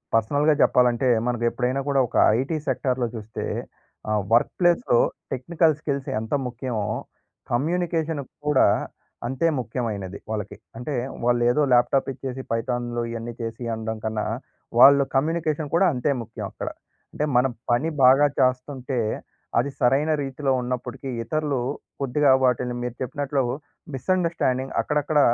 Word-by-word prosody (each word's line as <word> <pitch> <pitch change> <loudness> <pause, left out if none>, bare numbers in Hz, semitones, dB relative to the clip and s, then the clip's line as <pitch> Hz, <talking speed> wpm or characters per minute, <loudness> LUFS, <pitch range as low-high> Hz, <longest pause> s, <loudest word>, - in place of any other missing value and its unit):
పర్సనల్‌గా 145 +7 +3
చెప్పాలంటే, 125 0 +3 0.2
మనకు 120 -1 0
ఎప్పుడైనా 125 +2 -1
కూడా 135 -1 +3
ఒక - - -2 0.2
ఐటీ 155 +4 -2
సెక్టార్‌లో 130 -3 0
చూస్తే 110 0 -6 0.7
ఆహ్, 105 -1 +1
వర్క్ 120 - +4
ప్లేస్‌లో 180 - +3 0.3
టెక్నికల్ 155 +4 +2
స్కిల్స్ 140 -3 -2
ఎంత 110 +4 -5 0.2
ముఖ్యమో 120 -4 -3 0.7
కమ్యూనికేషన్ 160 +2 0 0.3
కూడా 145 -3 +5 0.6
అంతే 135 +6 0
ముఖ్యమైనది 110 -6 -4
వాళ్ళకి. 105 -2 -4 0.2
అంటే 125 +5 -4 0.3
వాళ్ళు 120 0 +2
ఏదో 150 - +2
ల్యాప్‌టాప్ 125 +2 +3
ఇచ్చేసి 130 0 -6
పైథాన్‍లు 120 +1 -1
ఇవన్నీ 115 0 -5
చేసీ 115 +1 -5
అనడం 110 0 -4
కన్నా, 110 -1 -2 0.5
వాళ్ళ 140 +2 +9 0.2
కమ్యూనికేషన్ 155 +1 0
కూడా 190 - +5
అంతే 125 +3 0
ముఖ్యం 115 -1 -7
అక్కడ. - - -5 0.4
అంటే 150 - -1
మన 125 - +4 0.3
పని 130 +7 +2
బాగా 135 +3 +7
చేస్తుంటే 130 0 0 0.6
అది 130 +4 0
సరైన 140 +5 +3
రీతిలో 135 +1 -2
ఉన్నప్పటికీ 125 +2 -4
ఇతరులు 150 +1 -1 0.4
కొద్దిగా 140 +1 +3
వాటిని, 125 -1 +1
మీరు 125 -1 -4
చెప్పినట్లు 140 +1 -1 0.5
మిస్‌అండర్‌స్టాండింగ్స్ 150 -5 0
అక్కడక్కడ 150 0 +1
130 Hz, 125 wpm, -24 LUFS, 120-145 Hz, 0.7 s, వాళ్ళ